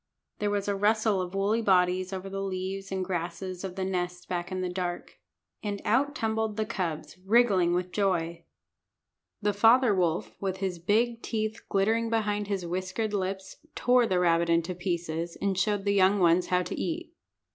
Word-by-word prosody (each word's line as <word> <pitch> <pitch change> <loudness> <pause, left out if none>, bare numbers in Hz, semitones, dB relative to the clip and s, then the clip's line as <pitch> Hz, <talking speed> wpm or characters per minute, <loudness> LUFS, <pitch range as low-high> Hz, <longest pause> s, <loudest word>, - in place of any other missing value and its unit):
There 210 - 0
was 205 -1 -1
a 200 - +1
rustle 210 0 +2
of 180 +1 -5
woolly 205 +4 +1
bodies 185 -2 +2
over 190 0 -5
the 195 0 -4
leaves 195 +1 -4
and 190 -1 -1
grasses 180 +1 -4
of 185 -2 -5
the 190 -1 -2
nest 180 -1 -3
back 175 0 -3
in 185 0 -2
the 185 - -1
dark. 180 -1 -4 0.4
And 205 -2 -3
out 275 +7 +2
tumbled 220 -3 -1
the 215 - 0
cubs, 185 -5 -4
wriggling 195 -5 +4
with 180 0 -2
joy. 175 -5 0 1.0
The 205 0 +2
father 225 +3 +5
wolf, 175 -3 0
with 190 -1 -2
his 190 -3 -3
big 230 +6 +1
teeth 220 0 -3
glittering 225 +3 +1
behind 210 -2 0
his 195 -3 -2
whiskered 185 +5 -2
lips, 190 -1 -3 0.2
tore 245 -1 +3
the 185 - +1
rabbit 170 -1 +3
into 170 +1 +2
pieces, 170 -2 -3
and 200 -1 0
showed 205 +1 0
the 200 - +2
young 195 +1 +4
ones 175 -1 +3
how 180 0 +2
to - - -5
eat. 335 0 -4
190 Hz, 180 wpm, -28 LUFS, 180-210 Hz, 1.0 s, father